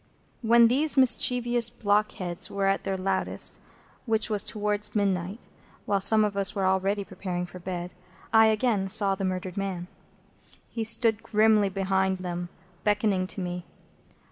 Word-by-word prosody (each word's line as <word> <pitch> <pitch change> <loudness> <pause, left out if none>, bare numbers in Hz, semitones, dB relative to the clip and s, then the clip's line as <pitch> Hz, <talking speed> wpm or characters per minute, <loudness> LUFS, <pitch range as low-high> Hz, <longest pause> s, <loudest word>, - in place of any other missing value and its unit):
When 235 0 +5
these 285 +5 +1
mischievous 240 -1 +2
blockheads 205 -6 -1
were 200 -1 -2
at 195 0 0
their 195 -1 -2
loudest, 190 0 -1 0.5
which 220 0 +1
was 210 -2 0
towards 210 0 -3
midnight, 195 +1 -1 0.4
while 200 -1 0
some 215 +2 +5
of 205 -1 -3
us 200 +1 +3
were 195 -1 -1
already 190 +2 0
preparing 180 -2 -5
for 180 +1 -11
bed, 180 0 -6 0.4
I 220 0 +6
again 215 -3 0
saw 195 0 +4
the 195 0 -5
murdered 185 0 -4
man. 190 -3 -3 0.9
He 225 - -3
stood 225 -1 +2
grimly 215 -1 +3
behind 190 0 0
them, 175 -1 -5 0.3
beckoning 205 -3 +1
to 195 - -6
me. 180 0 -5
200 Hz, 145 wpm, -26 LUFS, 185-220 Hz, 0.9 s, I